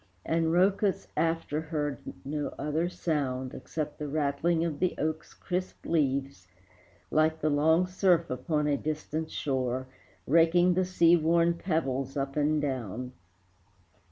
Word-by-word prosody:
And 165 0 +1
Rhœcus 190 +3 +2
after 165 -2 0
heard 150 -4 -3 0.3
no 145 +1 -3
other 155 +4 -1
sound, 135 -7 -2
Except 155 -2 -5
the 150 - -3
rattling 155 +3 0
of 155 -4 -3
the 185 - +1
oak's 155 +1 -3
crisp 185 +1 -4
leaves, 140 - 0 0.6
Like 160 +1 +2
the 155 - +1
long 160 +5 +4
surf 180 -2 +2
upon 150 +4 -1
a 145 -1 +2
distant 155 +1 -3
shore, 130 -2 -2 0.4
Raking 170 +4 +4
the 185 +1 +1
sea 175 -2 +5
worn 170 +1 +3
pebbles 135 -6 -2
up 135 0 -2
and 150 +1 +2
down. 125 -3 -3
155 Hz, 130 wpm, -29 LUFS, 140-170 Hz, 0.6 s, sea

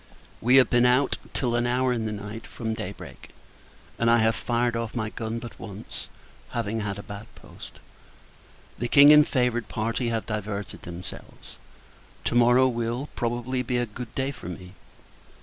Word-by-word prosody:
We 125 +3 +4
have 130 -1 +7
been 120 0 +5
out, 130 +2 +3
till 125 -3 -1
an 120 0 +1
hour 125 +1 +2
in 115 -2 -2
the - - -3
night, 105 +2 -7
from 110 -1 -4
day - - -4
break; - - -11 0.7
and 115 - +3
I 115 - +6
have 110 0 +3
fired 120 +1 0
off 115 0 -3
my 110 -2 -2
gun 110 0 -4
but 115 0 -8
once, 105 -1 -8 0.5
having 115 -1 -1
had 100 -2 -3
a 100 - -7
bad 100 +1 -8
post. - - -12 1.0
The 120 - -1
King, 145 +3 +9
and 150 0 +7
favoured 125 -4 +1
party, 115 +2 -1
have 115 -1 -2
diverted 105 -2 -4
themselves. 85 +1 -10 0.7
To - - 0
morrow 120 +2 +5
will, 120 +3 -2
probably, 120 +2 -1
be 125 0 -1
a 120 - +1
good 120 +2 -9
day 135 +1 0
for 90 - -9
me. 90 +1 -9
115 Hz, 175 wpm, -26 LUFS, 110-125 Hz, 1.0 s, King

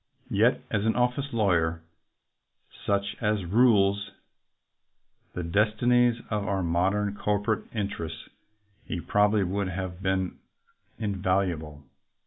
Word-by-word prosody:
Yet - - +3
as 100 -1 0
an 110 0 +1
office 125 +3 0
lawyer 85 -7 +1 0.5
— - - -23
such 100 0 0
as 105 -4 0
rules 100 -1 +3 1.2
the 90 - -4
destinies 115 +6 +2
of 105 -2 -1
our 95 -2 0
modern 95 +5 +1
corporate 105 +1 0
interests 100 -7 -4 0.3
— 105 -1 -40
he 90 - -3
probably 105 +3 +2
would 95 +2 -1
have 90 0 -5
been 95 -2 -1 0.6
invaluable. 90 -7 -1
100 Hz, 115 wpm, -27 LUFS, 90-105 Hz, 1.2 s, Yet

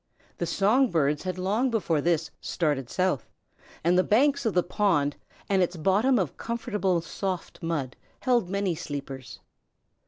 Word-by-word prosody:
The 170 - -1
song 215 +9 +3
birds 150 -4 +1
had 185 -1 -3
long 210 +8 +1
before 175 -10 +1
this 165 0 +1
started 145 -7 -1
south, 180 -10 0 0.5
and 170 +2 +3
the - - +4
banks 275 +5 +3
of 215 - -1
the 180 - +4
pond 175 -8 +1 0.3
and 195 -2 +2
its 180 0 0
bottom 205 +10 +3
of 180 -9 -1
comfortable 210 -6 -1
soft 185 +2 -4
mud 150 -7 -2 0.3
held 240 -8 +2
many 195 -2 0
sleepers. 140 -4 -7
185 Hz, 150 wpm, -27 LUFS, 160-210 Hz, 0.5 s, the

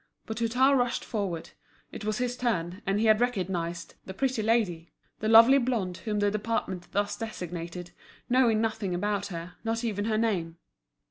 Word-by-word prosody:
But 220 0 -5
Hutin 250 +4 +3
rushed 245 -2 0
forward, 190 -7 -3 0.4
it - - -8
was 215 0 -1
his 245 0 -1
turn, 195 -7 -2
and 195 +1 +1
he 225 - +2
had 215 +1 +5
recognised 180 -7 -2
"the 190 - -7
pretty 260 -1 0
lady," 210 -7 0 0.3
the 215 - -1
lovely 230 +5 +8
blonde 225 -9 -1
whom 215 -2 -3
the 205 0 +2
department 205 -4 -3
thus 205 +1 0
designated, 175 -5 -6 0.4
knowing 240 -3 +3
nothing 220 -4 -1
about 205 +2 -1
her, 170 -1 -7
not 225 +1 -1
even 205 -3 -1
her 220 -1 +1
name. 180 -7 -1
215 Hz, 165 wpm, -28 LUFS, 180-230 Hz, 0.4 s, lovely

